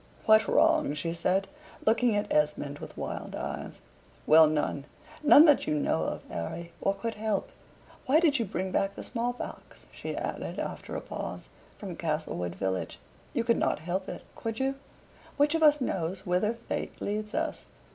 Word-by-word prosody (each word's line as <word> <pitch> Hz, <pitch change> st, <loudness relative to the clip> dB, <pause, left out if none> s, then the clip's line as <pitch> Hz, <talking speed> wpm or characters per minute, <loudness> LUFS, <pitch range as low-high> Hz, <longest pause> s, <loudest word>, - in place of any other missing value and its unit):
"What 220 Hz, 0 st, +6 dB
wrong?" 145 Hz, -, +3 dB
she 165 Hz, +3 st, -2 dB
said, 185 Hz, +3 st, +1 dB, 0.4 s
looking 225 Hz, 0 st, +3 dB
at 205 Hz, -, -1 dB
Esmond 150 Hz, -1 st, 0 dB
with -, -, -9 dB
wild -, -, -5 dB
eyes. -, -, -5 dB, 0.5 s
"Well, 160 Hz, 0 st, +8 dB
none 150 Hz, -2 st, -1 dB, 0.4 s
none 300 Hz, +1 st, +9 dB
that 295 Hz, -3 st, +4 dB
you 150 Hz, -, +1 dB
know 80 Hz, -, +1 dB
of, -, -, -4 dB
Harry, 170 Hz, -, -5 dB
or 195 Hz, -, +1 dB
could 230 Hz, +3 st, -3 dB
help. 220 Hz, -, -2 dB, 0.6 s
Why 290 Hz, +4 st, +5 dB
did 300 Hz, -5 st, +3 dB
you 230 Hz, -, +1 dB
bring 190 Hz, 0 st, -3 dB
back 195 Hz, +2 st, 0 dB
the -, -, -7 dB
small 240 Hz, 0 st, -1 dB
pox," 245 Hz, -, -9 dB
she -, -, -6 dB
added, -, -, -4 dB
after -, -, -5 dB
a -, -, -3 dB
pause, -, -, -6 dB, 0.3 s
"from 190 Hz, -4 st, -6 dB
Castlewood 150 Hz, -, -2 dB
village? 95 Hz, 0 st, -2 dB, 0.4 s
You 235 Hz, -, +2 dB
could 235 Hz, 0 st, +2 dB
not -, -, +1 dB
help 180 Hz, +4 st, -3 dB
it, -, -, -7 dB
could 225 Hz, -1 st, -4 dB
you? 270 Hz, +1 st, +1 dB, 0.6 s
Which 295 Hz, +1 st, +3 dB
of 325 Hz, -, +1 dB
us 300 Hz, -1 st, +6 dB
knows 190 Hz, -5 st, -2 dB
whither 185 Hz, +5 st, +1 dB
fate 235 Hz, -, -5 dB
leads 210 Hz, +1 st, -3 dB
us? 320 Hz, 0 st, -2 dB
195 Hz, 175 wpm, -29 LUFS, 160-235 Hz, 0.6 s, none